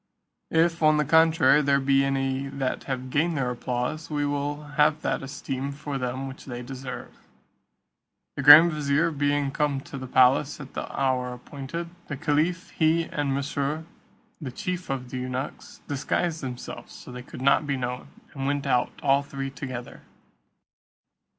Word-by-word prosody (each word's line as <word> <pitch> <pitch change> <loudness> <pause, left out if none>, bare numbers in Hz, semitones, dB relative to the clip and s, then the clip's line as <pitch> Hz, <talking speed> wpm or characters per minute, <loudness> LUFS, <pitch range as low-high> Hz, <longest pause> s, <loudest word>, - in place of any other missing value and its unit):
If, 165 +1 +2
on 155 -1 +5
the 150 - +2
contrary, 160 0 +5
there 140 -1 +3
be 135 0 +3
any 135 0 -1
that 135 -1 -3
have 130 -1 -4
gained 160 +3 +1
their 125 -2 0
applause, 125 +6 -3
we 145 -1 0
will 145 +1 -2
have 150 +1 +2
that - - 0
esteem 135 0 -4
for 140 -1 -5
them 130 +2 -3
which 135 +1 -10
they 125 -2 -6
deserve." 130 +1 -8 1.2
The - - -3
grand 150 +5 +10
vizier 150 +2 +1
being 145 -1 0
come 145 -1 0
to 135 - -8
the 130 - -6
palace 130 +4 +4
at 135 -2 -10
the - - -5
hour 130 -2 0
appointed, 140 +7 -7 0.2
the 140 - -4
caliph, 165 +4 0
he, 165 +1 +2
and 145 -3 -2
Mesrour 140 +2 -2 0.6
the 135 -4 -5
chief 180 +7 -4
of 125 -2 -4
the 130 - -4
eunuchs, 130 +2 -5
disguised 155 +4 -1
themselves 125 -3 -7
so - - -11
that 125 0 -8
they - - -20
could 130 - -7
not 140 +2 +4
be 140 -1 0
known, 125 0 -4 0.3
and 135 0 -3
went 145 0 -1
out 125 0 +2
all 140 0 +4
three 135 -1 -5
together. 130 -3 -7
140 Hz, 165 wpm, -26 LUFS, 130-150 Hz, 1.2 s, grand